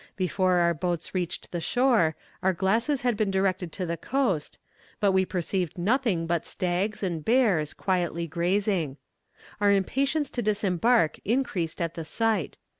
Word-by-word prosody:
Before 185 0 +1
our 170 -1 +3
boats 175 0 -3
reached 180 -3 -3
the 175 - -3
shore, 230 - +2 0.3
our 190 0 +2
glasses 225 - +1
had 245 -2 +1
been 205 -1 0
directed 190 -2 0
to 185 - -3
the 170 0 -3
coast, 195 - -1 0.4
but 205 -2 +3
we 190 0 +3
perceived 180 -1 -2
nothing 205 -2 +1
but 170 -1 0
stags 190 +4 -2
and 170 -5 -2
bears, 210 - +2
quietly 175 -3 -1
grazing. 175 -2 0 0.6
Our 205 -1 +4
impatience 275 +9 +1
to 240 - -2
disembark 205 -2 +2
increased 205 -9 -1
at 170 -1 -2
the 165 - -5
sight. 215 +1 -1
190 Hz, 150 wpm, -27 LUFS, 170-215 Hz, 0.6 s, Our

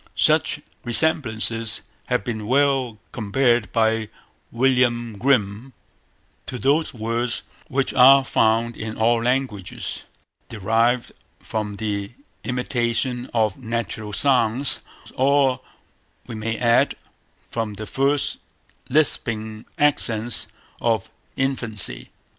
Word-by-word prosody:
Such - - +2 0.2
resemblances 115 -4 +1 0.3
have - - 0
been 110 -3 -4
well 135 -3 +2
compared 120 +1 +1
by 110 -1 +1 0.4
William 120 -2 +2
Grimm, 125 -1 +1 0.7
to 125 - -4
those 145 +6 +2
words 115 +1 -2 0.2
which 135 0 -1
are 135 +2 +8
found 115 -1 +2
in 110 0 -6
all 115 +1 +3
languages 125 -6 -2 0.4
derived 115 +3 +1 0.3
from 105 -2 -4
the 100 0 -3 0.3
imitation 125 0 -1
of 110 -4 +1
natural 110 -3 -4
sounds, 125 +2 +2 0.3
or, 135 -1 +3 0.7
we - - -8
may 110 +1 -3
add, 120 0 +3 0.6
from 110 -3 -3
the 110 +2 -6
first 140 +5 0 0.5
lisping 110 -6 0
accents 120 -6 0 0.3
of 115 -4 0 0.2
infancy. 115 - -1
120 Hz, 95 wpm, -22 LUFS, 110-130 Hz, 0.7 s, are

